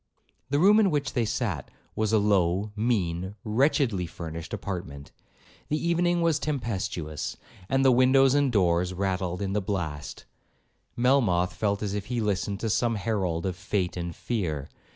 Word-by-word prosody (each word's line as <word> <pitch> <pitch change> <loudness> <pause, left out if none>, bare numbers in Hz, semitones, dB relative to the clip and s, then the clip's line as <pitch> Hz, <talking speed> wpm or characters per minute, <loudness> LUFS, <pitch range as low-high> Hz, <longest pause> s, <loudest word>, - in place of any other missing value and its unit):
The 140 - +1
room 200 +7 +6
in 205 -3 +4
which 145 -4 -1
they 120 -3 +1
sat - - -2 0.3
was 110 -1 0
a 110 - +4
low, 100 -1 +2
mean, 95 -5 -1
wretchedly 115 - +1
furnished 80 -1 -7
apartment; 75 -7 -6 0.6
the 150 - +1
evening 170 +1 +1
was 165 -3 +2
tempestuous, 95 - -3 0.3
and 135 0 +2
as - - +2
the 135 - +6
windows 130 +2 +5
and 140 -2 +3
doors 90 -3 +2
rattled 95 -1 -1
in 95 0 -2
the 105 - +1
blast, 85 -7 -4 0.7
Melmoth 120 -9 +3
felt 100 -1 -1
as 100 -1 -2
if 105 -1 -4
he 125 -1 -2
listened 100 -2 -1
to 115 - -1
some 115 +1 +1
herald 95 -5 -1
of 95 -2 -1
'fate 90 0 -2
and 85 -2 -4
fear.' 80 - -3
100 Hz, 160 wpm, -27 LUFS, 90-125 Hz, 0.7 s, room